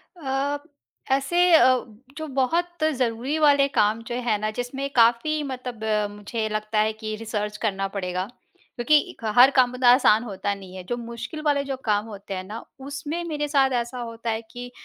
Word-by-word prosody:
अ, 280 Hz, -2 st, -1 dB, 0.5 s
ऐसे 275 Hz, +6 st, +1 dB, 0.2 s
अ, 255 Hz, -5 st, +5 dB, 0.3 s
जो 315 Hz, -, -5 dB
बहुत 345 Hz, +5 st, 0 dB
ज़रूरी 250 Hz, +3 st, -1 dB
वाले 285 Hz, -2 st, +5 dB
काम 220 Hz, -3 st, +1 dB
जो 240 Hz, -, -3 dB
हैं 225 Hz, -4 st, +1 dB
ना, 215 Hz, 0 st, -1 dB
जिसमें 255 Hz, +4 st, -4 dB
काफ़ी 240 Hz, +7 st, +3 dB
मतलब 255 Hz, -4 st, -6 dB, 0.3 s
मुझे 210 Hz, +2 st, -4 dB
लगता 215 Hz, 0 st, -1 dB
है 215 Hz, +1 st, +2 dB
कि 215 Hz, 0 st, -5 dB
रिसर्च 210 Hz, -1 st, -4 dB
करना 195 Hz, -3 st, -1 dB
पड़ेगा, 185 Hz, -2 st, -3 dB, 0.5 s
क्योंकि 275 Hz, +6 st, +4 dB
इक् -, -, -19 dB
हर 260 Hz, +3 st, +9 dB
काम 250 Hz, -2 st, +3 dB
इतना 250 Hz, -1 st, +4 dB
आसान 235 Hz, -3 st, +5 dB
होता 200 Hz, -2 st, -3 dB
नहीं 190 Hz, -2 st, -12 dB
है। 185 Hz, -, -7 dB
जो 240 Hz, -, -1 dB
मुश्किल 235 Hz, +5 st, -7 dB
वाले 285 Hz, -1 st, +2 dB
जो 275 Hz, -1 st, -4 dB
काम 210 Hz, -1 st, +1 dB
होते 200 Hz, -2 st, -8 dB
हैं 185 Hz, -1 st, -4 dB
ना, 215 Hz, +4 st, -8 dB, 0.2 s
उसमें 285 Hz, +5 st, -5 dB
मेरे 295 Hz, -2 st, -2 dB
साथ 275 Hz, -2 st, +3 dB
ऐसा 240 Hz, +2 st, -7 dB
होता 230 Hz, -1 st, -5 dB
है 220 Hz, +1 st, -2 dB
कि 245 Hz, 0 st, -8 dB
240 Hz, 180 wpm, -24 LUFS, 215-275 Hz, 0.5 s, हर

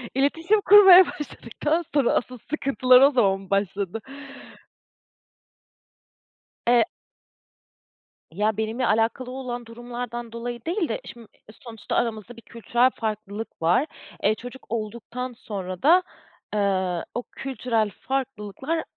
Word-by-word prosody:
İletişim 325 Hz, +10 st, +2 dB
kurmaya 385 Hz, -3 st, +9 dB
başladıktan 300 Hz, +4 st, -3 dB
sonra 280 Hz, -5 st, +3 dB
asıl 250 Hz, +1 st, -2 dB
sıkıntılar 260 Hz, -4 st, +4 dB
o 280 Hz, +2 st, +7 dB
zaman 195 Hz, -6 st, +1 dB
başladı. 200 Hz, +1 st, -1 dB, 2.7 s
Eee 240 Hz, 0 st, +6 dB, 1.5 s
Ya, 210 Hz, +4 st, 0 dB
benimle 220 Hz, +3 st, -1 dB
alakalı 225 Hz, +4 st, 0 dB
olan 245 Hz, -2 st, -5 dB
durumlardan 240 Hz, 0 st, -7 dB
dolayı 235 Hz, 0 st, -6 dB
değil 340 Hz, -, -1 dB
de 225 Hz, -, -3 dB
şimdi 235 Hz, -2 st, -11 dB, 0.4 s
sonuçta 225 Hz, -4 st, -6 dB
aramızda 230 Hz, 0 st, -2 dB
bir -, -, -11 dB
kültürel 235 Hz, +3 st, +1 dB
farklılık 215 Hz, -2 st, -5 dB
var. 175 Hz, -, +3 dB, 0.3 s
E, 215 Hz, +2 st, +2 dB
çocuk 245 Hz, +3 st, -11 dB
olduktan 235 Hz, +3 st, -5 dB
sonra 190 Hz, -5 st, -7 dB
da, 350 Hz, +5 st, +6 dB, 0.5 s
ııı, 190 Hz, -4 st, 0 dB
o 245 Hz, -, -2 dB
kültürel 230 Hz, -5 st, -1 dB
farklılıklar 270 Hz, +3 st, -3 dB
235 Hz, 110 wpm, -24 LUFS, 215-265 Hz, 2.7 s, kurmaya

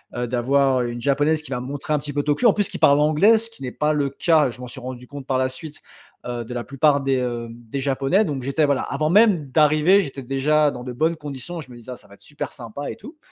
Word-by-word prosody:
heu, 120 Hz, 0 st, -2 dB
d'avoir, 130 Hz, +2 st, +2 dB
heu, 120 Hz, -, -2 dB
une 120 Hz, -, -7 dB
japonaise 145 Hz, +4 st, +1 dB
qui 140 Hz, -, -12 dB
va 125 Hz, -2 st, -2 dB
me 125 Hz, -, -7 dB
montrer 145 Hz, +2 st, -4 dB
un 150 Hz, -, +2 dB
petit 145 Hz, -1 st, -6 dB
peu 145 Hz, 0 st, -1 dB
Tokyo 150 Hz, +11 st, +2 dB
en 215 Hz, -, +5 dB
plus 205 Hz, -2 st, 0 dB
qui -, -, -7 dB
parle 140 Hz, 0 st, +5 dB
anglais!» 155 Hz, +10 st, +5 dB
ce 230 Hz, +1 st, -4 dB
qui 225 Hz, -, -18 dB
n'est 125 Hz, -2 st, -4 dB
pas 150 Hz, 0 st, 0 dB
le 145 Hz, -2 st, 0 dB
cas, 150 Hz, -1 st, +2 dB
je 120 Hz, -, -11 dB
m'en 125 Hz, -, -7 dB
suis 130 Hz, -, -10 dB
rendu 125 Hz, 0 st, -8 dB
compte 140 Hz, -1 st, -9 dB
par 130 Hz, -1 st, +1 dB
la 130 Hz, 0 st, +1 dB
suite, 150 Hz, +3 st, -10 dB, 0.5 s
heu, 120 Hz, -1 st, -4 dB
de 125 Hz, -, -7 dB
la 120 Hz, -1 st, -3 dB
plupart 140 Hz, +4 st, +2 dB
des, 135 Hz, -1 st, +1 dB
heu, 120 Hz, -2 st, -3 dB
des 120 Hz, +3 st, -7 dB
japonais. 135 Hz, +9 st, +1 dB
Donc 140 Hz, -5 st, -3 dB
j'étais 140 Hz, +4 st, +1 dB
voilà 140 Hz, -2 st, +1 dB
avant 155 Hz, +2 st, -2 dB
même 195 Hz, -8 st, +4 dB
d'arriver 155 Hz, +6 st, +4 dB
j'étais 135 Hz, -5 st, -7 dB
déjà 145 Hz, +3 st, +2 dB
dans 125 Hz, -, -8 dB
de 125 Hz, 0 st, -6 dB
bonnes 160 Hz, +6 st, +1 dB
conditions 150 Hz, +3 st, -7 dB
je 135 Hz, -, -14 dB
me -, -, -11 dB
disais: 120 Hz, +2 st, -10 dB
«Ah 125 Hz, -, -5 dB
ça 105 Hz, -, -16 dB
va 100 Hz, -, -16 dB
être -, -, -29 dB
super 145 Hz, -, -7 dB
sympa» 125 Hz, +2 st, -7 dB
et -, -, -7 dB
tout. 305 Hz, +2 st, -13 dB
140 Hz, 285 wpm, -22 LUFS, 125-155 Hz, 0.5 s, en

